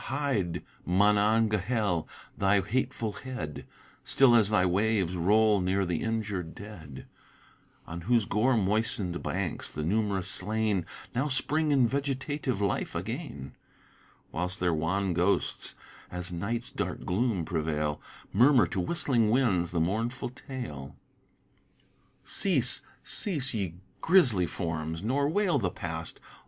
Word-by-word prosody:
hide 130 - -1 0.2
Monongahel 105 0 +2 0.3
thy 100 +1 +3
hateful 115 +2 -1
head 110 - -6 0.4
(Still 135 -3 +5
as 110 -4 +5
thy 105 -4 +3
waves 95 -1 +1
roll 105 +3 +3
near 95 +2 +1
the 85 -2 -1
injur'd 105 -7 -3
dead) 85 -11 -10 0.8
On 85 +1 -7
whose 115 +3 +2
gore 115 +6 +2
moistened 105 -2 0
banks - - -3
the 75 - -5
num'rous 100 +1 0
slain, 105 -2 0 0.3
Now 130 +5 0
spring 150 +3 0
in 135 -3 +4
vegetative 135 -1 -2
life 100 -2 -1
again, 70 -1 -5 0.8
Whilst 90 +3 -3
their 90 -2 +1
wan 90 +4 0
ghosts 90 +4 0 0.3
as 90 0 -4
night's 115 +8 -3
dark - - -4
gloom 100 -3 0
prevail 75 -3 -2 0.3
Murmur 125 +1 +6
to 95 - -2
whistling 120 - +1
winds 105 -9 +2
the 85 - -1
mournful 115 +10 -1
tale; 120 - -8 1.3
Cease, - - +3 0.2
cease, 145 -10 +1
ye 95 -6 -2 0.3
grisly 125 - +5
forms, 80 0 -3
nor 140 +6 +1
wail 180 -4 +2
the 95 -6 0
past. 85 -2 -5
105 Hz, 120 wpm, -29 LUFS, 90-120 Hz, 1.3 s, Murmur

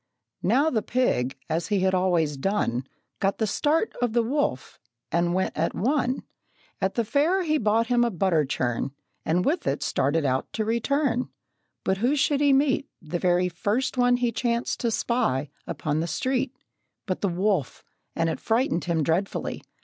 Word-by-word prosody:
Now 270 - +3
the 220 - +1
pig, 140 - 0
as 165 +1 -1
he 205 -3 +1
had 190 0 +2
always 175 -5 +2
done, 135 - -1 0.3
Got 195 0 +1
the 220 - +1
start 305 - +1
of 240 -3 +1
the 235 -1 +3
wolf, 245 - -2 0.3
and 175 +1 +1
went 190 - 0
at 165 +2 -1
one. 260 +3 0 0.6
At 190 0 0
the 235 - +1
fair 320 - +2
he 310 -2 +1
bought 220 +1 +2
him 240 0 +3
a 240 - +2
butter 180 -5 +2
churn, 130 -1 -2 0.3
And 175 +3 +1
with 320 +4 0
it 140 - 0
started 145 +3 +1
out 130 -1 0
to 220 - -1
return; 250 +3 0 0.5
But 190 0 0
who 250 +7 +2
should 285 0 +2
he 285 -1 +5
meet 275 0 +2
The 170 +1 -4
very 180 0 +2
first 205 +10 -1
one 245 -1 +4
he 245 -1 +1
chanced 235 +1 -1
to 235 - 0
spy 215 - 0 0.2
Upon 150 0 -2
the 165 - -1
street, 255 - -1 0.5
But 185 -3 -3
the 200 - +1
wolf! 180 - -1 0.3
and 165 - +1
it 160 - -2
frightened 225 -6 0
him 165 -3 +1
dreadfully. 170 +6 -1
210 Hz, 175 wpm, -26 LUFS, 170-250 Hz, 0.6 s, he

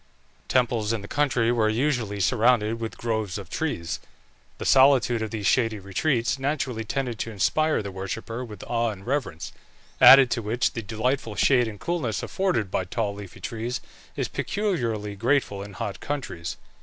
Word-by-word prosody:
Temples 115 -3 +1
in 110 -3 -3
the - - -7
country 125 -5 +1
were 110 -3 +2
usually 115 -4 0
surrounded 115 +1 +2
with 115 -1 -5
groves 110 -5 -2
of 95 -3 -9
trees. 85 - -2 0.6
The - - -6
solitude 130 -4 +5
of 110 - -2
these 105 -2 -4
shady 115 -2 +2
retreats 115 +7 0
naturally 135 -4 -1
tended 120 0 -3
to - - -3
inspire 155 - +1
the 100 - -5
worshipper 110 +5 -5
with 105 -5 -9
awe 115 -1 0
and 100 -3 -8
reverence, 125 - -2 0.5
added 135 -2 +9
to 115 - 0
which 115 +3 0
the 115 - -3
delightful 110 +2 -2
shade 125 -1 +4
and 105 -2 -7
coolness 165 -11 -2
afforded 180 - -1
by 95 - 0
tall 105 +2 -2
leafy 100 -2 -10
trees 115 +2 -3 0.4
is - - -1
peculiarly 115 - -2
grateful 115 -2 +1
in 100 0 -8
hot 100 +1 -5
countries. 130 -13 -4
115 Hz, 165 wpm, -25 LUFS, 105-130 Hz, 0.6 s, added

